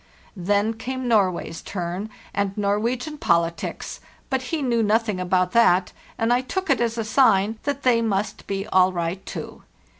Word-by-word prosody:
Then 205 +4 +1
came 255 +3 -4
Norway's 185 -7 +1
turn, 180 +2 -4 0.2
and 200 0 -1
Norwegian 235 +9 -1
poll 170 0 +3
tics; 170 - -6 0.3
but 265 -1 +1
he 320 -3 -1
knew 235 -3 +2
nothing 215 -2 +1
about 180 0 +1
that, 185 -6 +4 0.3
and 225 +2 +2
I 245 - +2
took 380 +9 -2
it - - +2
as 230 -1 0
a 225 - 0
sign 220 -3 +3
that 280 0 -2
they 240 -3 +4
must 210 -2 -2
be 195 0 -2
all 185 -1 +4
right 175 +2 -3
too. - - -7
210 Hz, 170 wpm, -23 LUFS, 185-235 Hz, 0.3 s, that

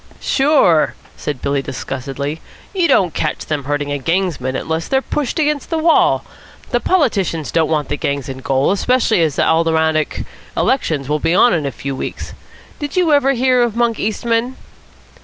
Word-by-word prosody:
"Sure," 270 - +3 0.2
said 145 -4 -5
Billy 140 -1 0
disgustedly. 135 +3 -5 0.3
"You 365 -3 +2
don't 180 - +3
catch - - -2
them 145 -3 -3
hurting 145 0 -2
a 145 - -2
gangsman 165 -4 -1
unless 160 +3 -2
they're 265 - +2
pushed 280 +1 -3
against 300 -3 0
the 325 - 0
wall. 320 +1 +3 0.5
The - - +2
politicians 200 - 0
don't 165 -2 +1
want 155 -2 0
the 145 - -2
gangs 140 -2 -2
in 130 -1 -6
gaol, 135 +3 +1
especially 225 -1 +2
as 155 -4 +1
the - - +2
Aldermanic 160 -1 +1 0.3
elections 155 - 0
will 150 +1 0
be 165 +3 +1
on 240 +5 +5
in 155 -5 0
a - - -2
few 135 +3 -5
weeks. - - -6 0.5
Did 290 +3 -5
you 340 -4 +3
ever 275 -1 +4
hear 255 0 +2
of 235 -2 0
Monk 235 -2 +1
Eastman?" 230 +3 -1
165 Hz, 175 wpm, -17 LUFS, -, 0.5 s, on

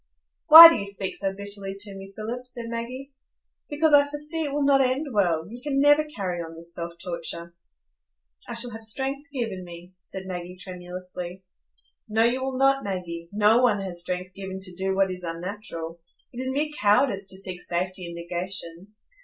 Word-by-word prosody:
"Why 325 +2 +14
do 330 - +3
you 200 - -4
speak 200 -1 -3
so 195 -1 -1
bitterly 200 -1 -3
to 200 0 -4
me, 195 0 -10
Philip?" 240 +4 -5
said 235 -2 -4
Maggie. 250 +4 -6 0.6
"Because 300 +1 +2
I 285 0 +7
foresee 300 +3 -4
it 285 - -3
will 290 0 0
not 275 -1 +5
end 260 +3 +1
well; 170 -5 +1
you 240 +4 -10
can 275 0 -1
never 290 +2 +5
carry 190 - -4
on 165 0 -8
this 170 +1 -3
self 170 0 -5
torture." 170 -1 -6 0.9
"I 240 - -5
shall 240 +1 -2
have 225 0 -8
strength 270 +6 -3
given 225 -9 -3
me," 175 +1 -12
said 190 0 -8
Maggie, 180 -1 -6
tremulously. 180 0 -7 0.7
"No, 220 +1 +3
you 245 +3 +2
will 265 0 -3
not, 270 0 +3
Maggie; 170 -4 -5
no 210 +3 +4
one 225 -5 +3
has 180 -3 -2
strength 180 +1 -4
given 190 0 -6
to 185 -1 -4
do 190 +1 -1
what 195 -1 +2
is 180 0 -6
unnatural. 170 -1 -6 0.3
It 245 - -5
is 260 - -2
mere 295 +3 -1
cowardice 205 -1 +3
to 190 - -6
seek 185 -2 -5
safety 180 +1 -2
in 170 - -8
negations. 180 +3 -5
200 Hz, 185 wpm, -25 LUFS, 180-255 Hz, 0.9 s, Why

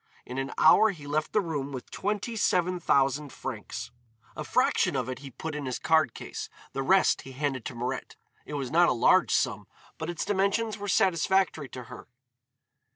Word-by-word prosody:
In 125 +2 -5
an 135 +1 -3
hour 215 +7 +6
he 160 -8 -7
left 150 +2 -1
the 210 - +3
room 145 -6 -3
with 130 -2 -8
twenty 210 +3 -2
seven 180 -4 +1
thousand 140 -2 +1
francs. - - -6 0.4
A - - -4
fraction - - +2
of 130 -3 -1
it 130 0 -5
he 140 0 -9
put 160 +5 -6
in 145 -2 -4
his 130 - -2
card 160 -6 +2
case, - - -6 0.2
the 135 - -2
rest 190 +8 +3
he 135 - -11
handed 135 -3 -2
to 125 - -5
Mirette. 125 +2 -4 0.3
It 150 - -7
was 135 -3 -3
not 170 +1 +5
a - - +3
large 125 +9 +4
sum, 110 -8 0 0.3
but 160 +1 -4
its 175 - -3
dimensions 205 +2 0
were 205 - -5
satisfactory 185 -5 +2
to 125 - -8
her. - - -11
150 Hz, 190 wpm, -28 LUFS, 135-185 Hz, 0.4 s, hour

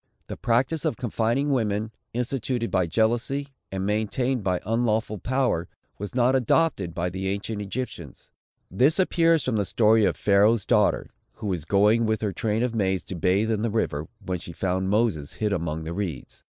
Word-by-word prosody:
The - - -6
practice 130 +6 0
of - - -1
confining 120 +4 0
women, 110 -4 0 0.2
instituted 125 0 -2
by 90 -2 +2
jealousy, 120 - 0 0.2
and 95 0 -2
maintained 110 +4 0
by 90 -2 0
unlawful 110 -1 0
power, 125 -10 0 0.3
was 105 +4 -6
not 125 +1 +3
adopted 125 - +1
by 90 +1 -1
the 95 +1 -3
ancient 100 +2 -3
Egyptians. 100 - -6 0.4
This 130 - +3
appears 165 -4 +3
from 125 -4 0
the 105 - +2
story 110 +3 +3
of - - 0
Pharaoh's 105 +2 +3
daughter, - - +2 0.2
who 110 - -9
was 90 -6 -2
going 105 +4 +3
with 110 0 0
her 105 -3 -1
train 110 +3 0
of 125 -2 -1
maids 95 -4 0
to 95 - -7
bathe 95 +6 +1
in 105 -2 0
the 115 - 0
river, 80 -9 -1 0.2
when 90 -1 -2
she 85 0 -9
found 95 +2 -1
Moses 100 -9 0
hid 105 -2 -1
among 80 -3 -2
the 80 +1 -5
reeds. 85 -9 -5
110 Hz, 180 wpm, -25 LUFS, 95-120 Hz, 0.4 s, not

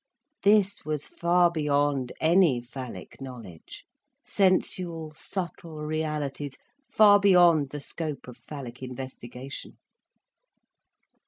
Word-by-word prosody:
This 205 0 +3
was 150 -1 -3
far 175 0 +2
beyond 145 -4 0
any 165 -5 +4
phallic 125 +2 -9
knowledge, 115 -11 -10 0.4
sensual 180 -4 0
subtle 165 -2 -6
realities 150 -3 -3 0.3
far 210 -5 +6
beyond 175 -7 +5
the 145 - -6
scope 150 0 -5
of 125 - -9
phallic 125 -1 -9
investigation. 130 0 -8
150 Hz, 90 wpm, -27 LUFS, 135-175 Hz, 0.4 s, far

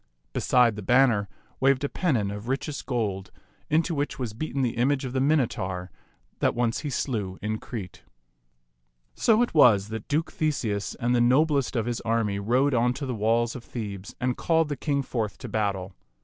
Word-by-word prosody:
Beside 120 -4 +3
the 105 - -6
banner 115 -2 +3 0.3
waved 135 0 +3
a - - +2
pennon 125 - 0
of 105 +3 -7
richest 140 +3 -3
gold, 100 -7 -2 0.4
into 165 +2 +2
which 145 0 -2
was 125 -6 -4
beaten 140 +2 -2
the 120 -3 -1
image 135 +3 +1
of 125 - -5
the 130 - +1
Minotaur 95 - 0 0.5
that - - +1
once 120 -1 0
he 150 - -4
slew 105 -8 -2
in 110 +1 -3
Crete. 100 -7 -7 1.1
So 225 +1 +3
it 245 - -3
was 110 -10 +5
that 110 -1 -6
Duke 155 +2 0
Theseus 115 -10 -1
and 120 +1 0
the 120 - +3
noblest 140 +3 +3
of 115 -2 0
his 120 -1 -2
army 110 -3 0
rode 125 +7 +2
on 120 0 +2
to 140 - -4
the 130 - -3
walls 115 +2 +1
of 125 - -7
Thebes 105 -5 -6
and 125 -1 0
called 165 -2 +1
the 145 - -1
king 140 +1 -1
forth 115 -5 -3
to - - -8
battle. 100 -3 -2
120 Hz, 185 wpm, -26 LUFS, 105-140 Hz, 1.1 s, was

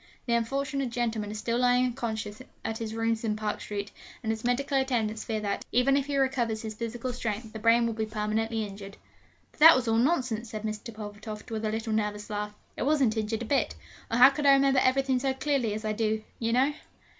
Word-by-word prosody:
The 235 - 0
unfortunate 275 +3 0
gentleman 230 -3 -2
is 215 - -5
still 230 +2 -1
lying 250 0 +4
unconscious 225 -3 -4 0.2
at 225 0 -2
his 225 -1 -4
rooms 225 0 0
in 215 -2 0
Park 215 -1 -3
Street; 205 0 -5 0.3
and 220 - 0
his 220 0 -4
medical 270 +3 +1
attendants 225 -5 -1
fear 220 -1 -2
that, 200 -1 -2
even 250 +3 +4
if 280 0 0
he 285 -1 -1
recovers 240 -5 0
his 220 -1 -4
physical 235 +3 -4
strength, 220 -2 -4
the 220 - -6
brain 230 +2 +4
will 230 - -1
be 220 0 -2
permanently 220 +1 -1
injured.' 200 0 -9 0.5
'But - - -25
that 325 +2 +10
was 255 -2 0
all 225 0 +3
nonsense!' 245 -4 +1
said 215 -1 -6
Mr. 215 +1 -4
Pulvertoft, 215 +1 -8
with 220 0 -2
a - - +1
little 220 0 -2
nervous 210 -1 -2
laugh, 210 0 -3 0.2
'it - - -6
wasn't 270 -5 +2
injured 220 +1 -2
a - - -5
bit, 275 +4 +1 0.3
or 230 - 0
how 255 +3 +9
could 285 +1 -1
I 275 - +9
remember 275 -1 +4
everything 260 0 +2
so 265 0 0
clearly 265 -5 0
as 215 +1 -5
I 215 - 0
do, 215 0 0 0.2
you 230 -1 0
know?' 265 +5 +3
225 Hz, 220 wpm, -28 LUFS, 215-255 Hz, 0.5 s, that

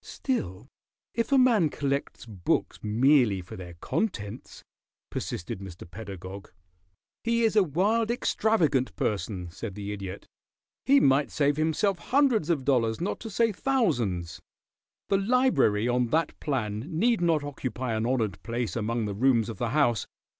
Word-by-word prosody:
"Still, 110 - -3 0.5
if 230 +4 -1
a 275 - +5
man 230 -11 +4
collects 140 -3 -3
books 100 -6 -1
merely 120 -1 +3
for 90 0 -9
their 90 -2 -9
contents 110 - -4 0.2
" - - -67
persisted 85 +2 -4
Mr. 95 -3 -9
Pedagog. 95 0 -9 0.7
"He 230 0 +1
is 220 -1 +2
a 210 - +7
wild, 200 +7 +1
extravagant 180 - +1
person," 95 -4 -2
said 100 +2 -7
the 105 0 -5
Idiot. 100 -1 -7 0.6
"He 280 +1 +7
might 135 - +3
save 145 -1 +1
himself 160 +5 +1
hundreds 255 - +2
of 145 -6 0
dollars, 115 -5 +2
not 180 +4 -2
to 225 - -7
say 225 +2 +2
thousands. 120 - 0 0.7
The 195 - +3
library 200 - +3
on 125 0 +2
that 160 +7 +1
plan 110 -8 -2
need 210 +6 +1
not 165 -4 +2
occupy 130 -3 -4
an 110 +1 0
honored 115 -8 -1
place 115 -3 -3
among 115 0 -1
the 105 - -3
rooms 115 +1 +2
of 115 - -7
the 120 -2 -1
house. 120 -5 +2
130 Hz, 150 wpm, -27 LUFS, -, 0.7 s, a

